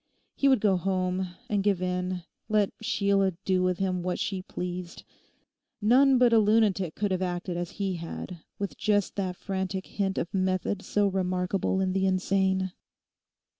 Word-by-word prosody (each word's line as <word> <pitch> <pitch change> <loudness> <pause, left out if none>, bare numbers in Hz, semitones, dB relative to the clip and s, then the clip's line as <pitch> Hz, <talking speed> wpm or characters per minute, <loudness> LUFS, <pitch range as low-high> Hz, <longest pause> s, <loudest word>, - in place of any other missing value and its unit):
He 275 - +1
would 265 -6 +4
go 195 -3 +3
home 185 0 -1
and 205 -2 0
give 200 -3 +2
in; 180 0 -2 0.3
let 210 -2 +2
Sheila 200 -3 +2
do 185 -1 +2
with 180 -1 +1
him 185 -2 -1
what 180 0 -2
she 190 -2 -2
pleased. 180 -1 -6 0.8
No 230 +5 +5
one 275 -1 +5
but 245 -1 +5
a 225 - +7
lunatic 205 -5 +2
could 205 -1 -1
have 185 0 0
acted 180 0 -2
as 175 0 -3
he 195 -3 -1
had, 170 +1 -7 0.2
with 200 -1 -4
just 205 -2 +1
that 185 -2 -1
frantic 190 0 -3
hint 195 -2 -2
of 170 - -2
method 185 +1 0
so 205 0 +1
remarkable 185 0 0
in 185 -1 0
the 190 0 +2
insane. 190 0 +1
190 Hz, 170 wpm, -28 LUFS, 180-200 Hz, 0.8 s, a